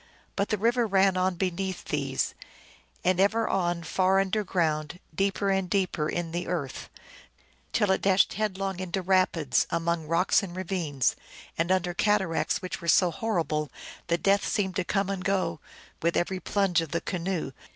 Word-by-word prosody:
But 200 Hz, -, 0 dB
the 215 Hz, -, +1 dB
river 235 Hz, +3 st, +2 dB
ran 195 Hz, -1 st, +3 dB
on 185 Hz, 0 st, +1 dB
beneath 185 Hz, +1 st, -2 dB
these, -, -, -1 dB, 0.7 s
and 185 Hz, 0 st, +2 dB
ever 220 Hz, +3 st, +3 dB
on 175 Hz, -2 st, 0 dB
far 190 Hz, +3 st, +2 dB
underground, 180 Hz, -5 st, 0 dB
deeper 195 Hz, +2 st, 0 dB
and 190 Hz, -2 st, 0 dB
deeper 180 Hz, -6 st, 0 dB
in 175 Hz, -1 st, -3 dB
tlie 175 Hz, +1 st, -3 dB
earth, 150 Hz, -7 st, -4 dB, 0.8 s
till 210 Hz, -3 st, +2 dB
it 190 Hz, -, +1 dB
dashed 195 Hz, -1 st, +3 dB
headlong 195 Hz, -3 st, -2 dB
into 185 Hz, +1 st, -3 dB
rapids, 175 Hz, -7 st, +2 dB
among 170 Hz, -1 st, -1 dB
roclj:s 170 Hz, +4 st, +3 dB
and 185 Hz, -3 st, -7 dB
ravines, 175 Hz, -8 st, -1 dB, 0.4 s
and 170 Hz, +2 st, 0 dB
under 180 Hz, -1 st, +1 dB
cataracts 195 Hz, -2 st, +1 dB
which 185 Hz, -, -5 dB
were 170 Hz, -, -7 dB
so 175 Hz, +1 st, +5 dB
hojr 215 Hz, 0 st, 0 dB
rible 150 Hz, -1 st, -2 dB, 0.4 s
that 170 Hz, 0 st, 0 dB
death 200 Hz, +1 st, +4 dB
seemed 190 Hz, -3 st, -1 dB
to 185 Hz, -, +1 dB
come 195 Hz, +2 st, 0 dB
and 190 Hz, -2 st, -3 dB
go 195 Hz, -, 0 dB, 0.4 s
with 170 Hz, +1 st, +1 dB
even 185 Hz, +1 st, -1 dB
plunge 190 Hz, -2 st, +1 dB
of 165 Hz, -, -5 dB
the 170 Hz, -, -1 dB
canoe. 180 Hz, -5 st, -3 dB
185 Hz, 165 wpm, -27 LUFS, 170-195 Hz, 0.8 s, so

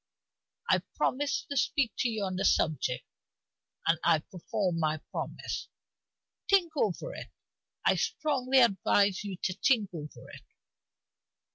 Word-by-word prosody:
I -, -, +4 dB, 0.2 s
promised 285 Hz, +2 st, 0 dB
to 280 Hz, -, -1 dB
speak 260 Hz, -2 st, +2 dB
to 245 Hz, -, +2 dB
you 220 Hz, -3 st, -2 dB
on 185 Hz, -1 st, -2 dB
the 185 Hz, -, -1 dB
subject, 145 Hz, -5 st, +1 dB, 0.8 s
and 165 Hz, 0 st, +3 dB
I -, -, +5 dB
perform 180 Hz, +2 st, -3 dB
my 155 Hz, -1 st, +1 dB
promise. -, -, -4 dB, 0.8 s
Think 360 Hz, -5 st, +4 dB
over 250 Hz, -, -1 dB
it; -, -, -7 dB, 0.6 s
I -, -, +5 dB
strongly 270 Hz, -4 st, +2 dB
advise 200 Hz, -2 st, +3 dB
you 195 Hz, -3 st, -5 dB
to 185 Hz, -, 0 dB
think 210 Hz, -1 st, +1 dB
over 150 Hz, -3 st, -8 dB
it." -, -, -11 dB
205 Hz, 130 wpm, -30 LUFS, 175-265 Hz, 0.8 s, I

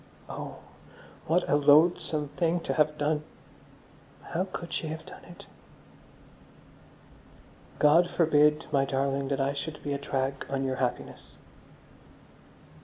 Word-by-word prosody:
Oh, -, -, -7 dB, 0.7 s
what 175 Hz, +3 st, +2 dB
a -, -, +3 dB
loathsome 150 Hz, 0 st, +3 dB
thing 170 Hz, +2 st, 0 dB
to -, -, -2 dB
have 150 Hz, -1 st, +1 dB
done. 150 Hz, +1 st, 0 dB, 1.1 s
How 180 Hz, +3 st, 0 dB
could 170 Hz, -2 st, -6 dB
she 160 Hz, -, -2 dB
have 160 Hz, +1 st, -6 dB
done -, -, -12 dB
it! 175 Hz, -, -13 dB, 2.3 s
_God 165 Hz, +4 st, +5 dB
forbid, 150 Hz, -3 st, +3 dB
my 140 Hz, -2 st, +3 dB
darling, 135 Hz, 0 st, -1 dB
that 140 Hz, 0 st, -1 dB
I 135 Hz, +1 st, 0 dB
should 150 Hz, +2 st, -5 dB
be 145 Hz, -, -2 dB
a 140 Hz, -, -3 dB
drag 135 Hz, -1 st, -3 dB
on 135 Hz, 0 st, -1 dB
your 130 Hz, -1 st, -2 dB
happiness. 125 Hz, -2 st, -4 dB
150 Hz, 125 wpm, -28 LUFS, 140-160 Hz, 2.3 s, God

